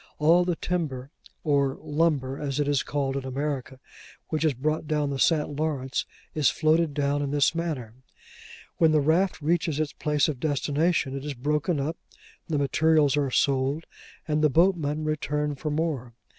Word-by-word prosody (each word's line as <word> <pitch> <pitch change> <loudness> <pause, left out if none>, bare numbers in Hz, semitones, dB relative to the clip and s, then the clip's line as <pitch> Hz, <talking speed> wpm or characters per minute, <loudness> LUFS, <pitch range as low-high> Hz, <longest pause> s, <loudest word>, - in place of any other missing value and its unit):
All 170 +4 +4
the 175 -1 0
timber, 150 -7 -3 0.3
or 140 -3 +2
'lumber,' 150 -3 0
as 145 -1 -2
it 145 - +1
is 145 -2 +2
called 140 -2 -2
in 140 - -2
America, 130 -1 -4 0.5
which 155 -1 -1
is 155 -4 +2
brought 155 +4 -1
down 150 -2 0
the 135 - -3
St. 150 -2 +2
Lawrence, 140 -4 -2 0.3
is 150 -3 +3
floated 155 -1 +2
down 145 0 0
in 140 - -2
this 145 +1 +2
manner. 155 -10 -3 0.8
When 160 -2 +4
the 155 - +5
raft 165 +6 +2
reaches 160 -1 +1
its 150 -2 -1
place 150 -1 +1
of 145 -5 -3
destination, 145 0 0
it 135 - -5
is 145 -1 -4
broken 150 +5 0
up; 155 +4 -2 0.5
the 155 - -1
materials 145 +1 +3
are 145 -2 +1
sold; 135 +4 +1 0.4
and 150 -1 +1
the 155 - +4
boatmen 155 -2 +2
return 150 -1 -1
for 150 +2 -4
more. 145 -6 -2
150 Hz, 170 wpm, -26 LUFS, 140-155 Hz, 0.8 s, the